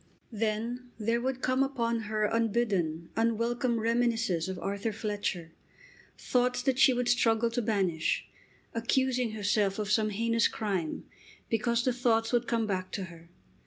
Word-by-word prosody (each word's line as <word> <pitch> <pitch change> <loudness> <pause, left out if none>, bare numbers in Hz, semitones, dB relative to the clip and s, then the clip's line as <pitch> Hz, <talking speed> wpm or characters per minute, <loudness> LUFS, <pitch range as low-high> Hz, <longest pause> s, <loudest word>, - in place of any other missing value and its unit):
Then 230 +3 -2
there 230 +2 0
would 260 0 -2
come 255 +1 +2
upon 235 -4 0
her 215 0 0
unbidden, 205 -8 0
unwelcome 230 +1 +1
reminiscences 225 -6 +1
of 190 - -4
Arthur 200 +4 -2
Fletcher, 205 -6 -3 0.7
thoughts 250 0 0
that 260 0 +1
she 265 - +7
would 245 -1 0
struggle 235 -1 +3
to 245 +1 -1
banish, 190 -8 0 0.5
accusing 245 0 +1
herself 205 -2 +1
of 210 -1 -2
some 215 0 +3
heinous 230 +2 +2
crime 190 -8 -3 0.5
because 235 +1 +1
the 255 - +2
thoughts 230 -2 +1
would 240 0 +2
come 230 -2 +1
back 185 -3 -2
to 195 - -2
her. 165 0 -16
225 Hz, 145 wpm, -29 LUFS, 205-240 Hz, 0.7 s, she